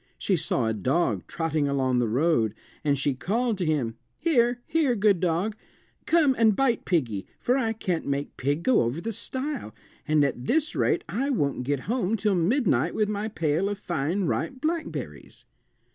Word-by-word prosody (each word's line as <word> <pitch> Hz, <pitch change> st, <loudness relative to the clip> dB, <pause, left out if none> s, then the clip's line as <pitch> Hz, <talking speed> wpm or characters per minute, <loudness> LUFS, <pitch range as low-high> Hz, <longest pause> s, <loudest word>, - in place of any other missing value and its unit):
She 195 Hz, -, +1 dB
saw 150 Hz, -7 st, 0 dB
a 110 Hz, -, +1 dB
dog 130 Hz, -, 0 dB
trotting 160 Hz, -3 st, -1 dB
along 130 Hz, -3 st, +1 dB
the 120 Hz, -, +1 dB
road, 120 Hz, -2 st, +1 dB, 0.3 s
and 145 Hz, -2 st, +2 dB
she 135 Hz, +1 st, +1 dB
called 220 Hz, -, -1 dB
to 175 Hz, -, 0 dB
him. 125 Hz, -8 st, 0 dB, 0.2 s
"Here! 245 Hz, -7 st, +2 dB
here, 300 Hz, -7 st, +1 dB
good 205 Hz, -3 st, +3 dB
dog; 180 Hz, +5 st, 0 dB, 0.5 s
come 315 Hz, -5 st, +4 dB
and 220 Hz, -3 st, +5 dB
bite 255 Hz, -2 st, +1 dB
piggy, 120 Hz, -, 0 dB
for 250 Hz, -, +1 dB
I 230 Hz, -5 st, +1 dB
can't 185 Hz, -6 st, -2 dB
make 140 Hz, 0 st, -2 dB
pig 145 Hz, +5 st, -1 dB
go 260 Hz, -, +4 dB
over 120 Hz, +6 st, -1 dB
the 225 Hz, +5 st, -4 dB
stile, 260 Hz, -, -4 dB, 0.3 s
and 150 Hz, -1 st, +4 dB
at 130 Hz, -2 st, -3 dB
this 310 Hz, +1 st, +1 dB
rate -, -, +1 dB
I 265 Hz, +7 st, -1 dB
won't 140 Hz, -, 0 dB
get 140 Hz, 0 st, -1 dB
home 225 Hz, -, 0 dB
till 210 Hz, 0 st, +1 dB
midnight 175 Hz, -, +2 dB
with 210 Hz, -1 st, +1 dB
my 210 Hz, +1 st, -2 dB
pail 165 Hz, -1 st, 0 dB
of 205 Hz, -, -3 dB
fine 175 Hz, 0 st, -1 dB
ripe 260 Hz, +8 st, -2 dB
blackberries." 315 Hz, +3 st, -4 dB
180 Hz, 175 wpm, -26 LUFS, 140-235 Hz, 0.5 s, and